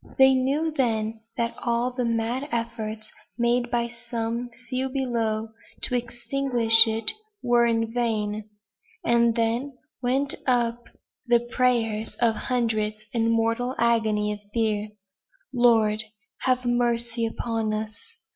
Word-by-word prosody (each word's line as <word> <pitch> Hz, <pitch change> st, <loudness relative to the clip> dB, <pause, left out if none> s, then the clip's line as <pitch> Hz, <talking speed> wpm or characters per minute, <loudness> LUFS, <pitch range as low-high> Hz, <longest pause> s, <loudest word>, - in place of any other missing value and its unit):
They 265 Hz, 0 st, +7 dB
knew 275 Hz, +5 st, +1 dB
then 225 Hz, -6 st, 0 dB, 0.2 s
that 235 Hz, 0 st, 0 dB
all 240 Hz, +1 st, 0 dB
the 250 Hz, 0 st, -2 dB
mad 235 Hz, +5 st, -1 dB
efforts 220 Hz, -2 st, -3 dB, 0.3 s
made 240 Hz, 0 st, +1 dB
by 240 Hz, -1 st, 0 dB
some 235 Hz, 0 st, -4 dB, 0.2 s
few 260 Hz, +2 st, -1 dB
below 230 Hz, -5 st, -1 dB, 0.3 s
to -, -, +1 dB
extinguish 240 Hz, -1 st, +3 dB
it 225 Hz, -, +3 dB, 0.3 s
were 240 Hz, -1 st, +4 dB
in 225 Hz, -1 st, 0 dB
vain; 215 Hz, -3 st, -1 dB, 0.6 s
and 235 Hz, -1 st, +3 dB
then 240 Hz, +4 st, -1 dB, 0.2 s
went 270 Hz, +3 st, +1 dB
up 240 Hz, -1 st, +1 dB, 0.4 s
the 240 Hz, -1 st, +4 dB
prayers 235 Hz, -3 st, 0 dB
of 235 Hz, -2 st, +4 dB
hundreds, 215 Hz, -3 st, -1 dB
in 230 Hz, -1 st, +2 dB
mortal 230 Hz, +3 st, +1 dB
agony 220 Hz, -3 st, +2 dB
of 205 Hz, -, -8 dB
fear: 215 Hz, -2 st, 0 dB, 0.6 s
"Lord! 225 Hz, -3 st, +4 dB, 0.4 s
have 255 Hz, -1 st, +2 dB
mercy 235 Hz, -1 st, 0 dB
upon 225 Hz, -1 st, -2 dB
us!" 215 Hz, 0 st, -3 dB
235 Hz, 120 wpm, -25 LUFS, 225-245 Hz, 0.6 s, They